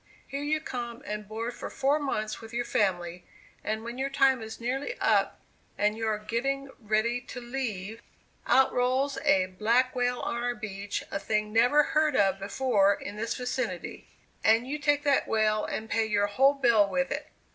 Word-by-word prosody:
Here 275 +1 -5
you 305 +2 0
come 240 -5 -6
and 210 -1 -5
board 225 +3 -4
for - - -7
four 275 +3 +1
months 215 -7 -3
with 225 +1 -10
your 240 0 -1
family, 175 -5 -1 0.4
and 220 +1 -2
when 235 +2 -6
your 270 +1 0
time 270 -3 +3
is 220 0 -8
nearly 265 - -3
up, - - +2 0.4
and 210 +1 +2
you 225 0 -3
are 215 -1 +1
getting 270 +6 -2
ready 220 +2 0
to 250 - -6
leave, 230 -4 -4 0.5
out 265 +2 +4
rolls 260 +3 +1
a 195 -10 +4
black 230 +7 +1
whale 245 0 0
on - - -2
our 245 0 -1
beach, 200 -2 -5
a 200 - -2
thing 210 0 -1
never 245 +6 +5
heard 305 -1 +1
of 195 -3 +3
before 200 -1 +2
in 205 - -8
this 225 +2 -2
vicinity, 250 -7 -4 0.4
and 225 +2 +4
you 300 +3 -3
take 290 -1 +2
that 285 -2 +2
whale 215 -1 +1
and 220 - -4
pay 225 0 +1
your 205 -1 +2
whole 270 +8 +3
bill 235 -7 +4
with 270 +4 -1
it! - - -4
235 Hz, 185 wpm, -28 LUFS, 215-265 Hz, 0.5 s, never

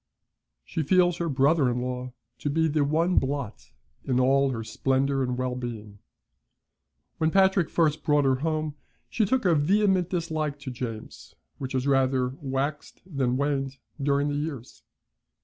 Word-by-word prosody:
She 160 - -3
feels 175 +3 +3
her 170 -1 -2
brother 140 0 +3
in 120 0 -1
law 125 0 -4 0.3
to 145 - -2
be 160 +3 +2
the 155 -1 +1
one 165 +5 +1
blot 135 -5 -4 0.3
in 130 -2 0
all 135 +2 +3
her 115 -3 -3
splendour 135 +4 0
and 125 -1 -1
well 130 0 -1
being. 110 -5 -7 1.2
When 160 - +2
Patrick 190 -1 +3
first 155 -2 +1
brought 145 -1 +3
her 130 -1 +3
home, 155 +1 -2 0.4
she 220 - +1
took 250 +2 0
a 175 - +5
vehement 185 +3 +2
dislike 160 -5 -2
to 135 -2 -5
James, 115 -3 -7 0.2
which 130 -1 -5
has 130 0 -1
rather 130 -2 +2
waxed 140 +2 -3
than 135 -8 -1
waned 135 -1 -1 0.2
during 140 +1 +1
the - - -2
years. 145 -5 -6
140 Hz, 155 wpm, -26 LUFS, 130-160 Hz, 1.2 s, a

